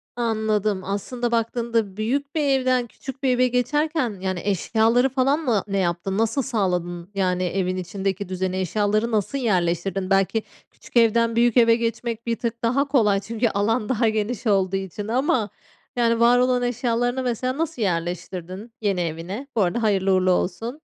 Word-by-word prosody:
Anladım 215 -4 0
aslında 235 +5 -3
baktığında 230 -3 -1
büyük 275 +7 -2
bir 315 - +1
evden 255 -3 +2
küçük 265 +3 -10
bir 265 - +3
eve 250 0 +3
geçerken, 250 - 0
yani, 185 -1 -2
eşyaları 225 +6 +2
falan 270 +3 +1
mı 240 - 0
ne 195 -1 -1
yaptın? 185 +1 -1
Nasıl 225 +5 +1
sağladın? 180 -8 -2
Yani 185 -2 0
evin 185 +1 -1
içindeki 190 +1 -3
düzene 185 0 -2
eşyaları 210 +5 0
nasıl 215 +5 0
yerleştirdin? 185 -4 0
Belki 195 +3 +2 0.3
küçük - - -6
evden 230 0 +3
büyük 235 0 +3
eve 230 -1 +6
geçmek 230 0 -3
bir 230 - +1
tık 235 -1 -4
daha 265 +5 +2
kolay 215 -8 +3
çünkü 230 +3 -1
alan 215 +2 0
daha 230 -3 +2
geniş 220 +2 -2
olduğu 195 -2 +2
için 195 +2 -4
ama, 240 -2 +1 0.5
yani, 230 -1 +2
var 240 +1 +5
olan 250 0 +2
eşyalarını 245 +1 0
mesela 255 +2 -2
nasıl 320 -5 -3
yerleştirdin, 180 +3 -3
yeni 200 -4 0
evine? 175 - -4
Bu 220 - +2
arada 195 +5 0
hayırlı 195 -3 +2
uğurlu 185 0 +3
olsun. 230 - -2
220 Hz, 160 wpm, -23 LUFS, 195-245 Hz, 0.5 s, eve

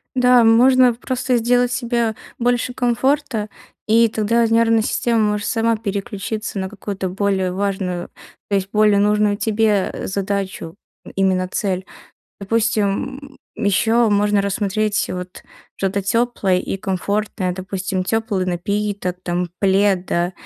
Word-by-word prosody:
Да, 250 -1 +5
можно 250 +2 +5
просто 255 +1 -1
сделать 245 +1 +2
себе 235 -3 -1 0.2
больше 245 +1 0
комфорта, 250 -2 0 0.4
и 230 +1 +5
тогда 230 +2 +1
нервная 225 0 +3
система 230 +1 0
может 210 -1 0
сама 230 -1 +1
переключиться 205 0 -4
на 190 - -2
какую-то 195 -2 -5
более 190 -1 0
важную 190 -2 -2 0.4
то 200 - +1
есть 195 0 -1
более 210 -1 +4
нужную 210 0 +2
тебе, 215 -3 +1
э, - - -5
задачу, 195 -3 -3 0.4
именно 185 -1 +1
цель. 185 -1 -2 0.6
Допустим, 230 +6 -1 0.2
м, - - -4
ещё 225 +3 +3
можно 205 0 +2
рассмотреть 205 +1 -1
вот 180 0 -7 0.3
что-то 195 +1 -1
тёплое 200 -2 +1
и 190 - -3
комфортное. 195 0 -2
Допустим, 190 0 -3
тёплый 220 -3 -1
напиток 195 +1 -2
там, 175 0 -2
плед, 195 -1 +2
да? 175 +2 0
210 Hz, 125 wpm, -20 LUFS, 195-230 Hz, 0.6 s, Да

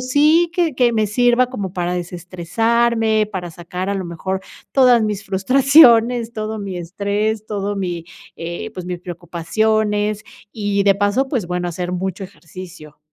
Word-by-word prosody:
sí 300 +6 +3
que 335 -6 +1
que 245 -2 +3
me 215 -1 +2
sirva 245 +3 +3
como 200 -7 -5
para 175 0 -1
desestresarme, 215 +6 0
para 180 -3 -5
sacar 180 +3 -5
a - - -1
lo 190 -2 -3
mejor, 190 +3 -4 0.3
todas 250 -4 +5
mis 210 -2 -2
frustraciones, 240 +2 +5
todo 215 0 -4
mi 195 -3 -5
estrés, 205 +5 -2
todo 205 -1 -3
mi, 175 -4 -3 0.3
eh, 170 +6 -6
pues, 180 -1 -7
mis 180 -1 -4
preocupaciones 210 +5 -1 0.3
y, 205 -2 -1
de 200 -1 +5
paso, 205 +7 +1
pues, 245 - -2
bueno, 180 0 -2
hacer 180 +1 -4
mucho 190 +1 -3
ejercicio. 175 -4 -12
205 Hz, 150 wpm, -19 LUFS, 180-230 Hz, 0.3 s, todas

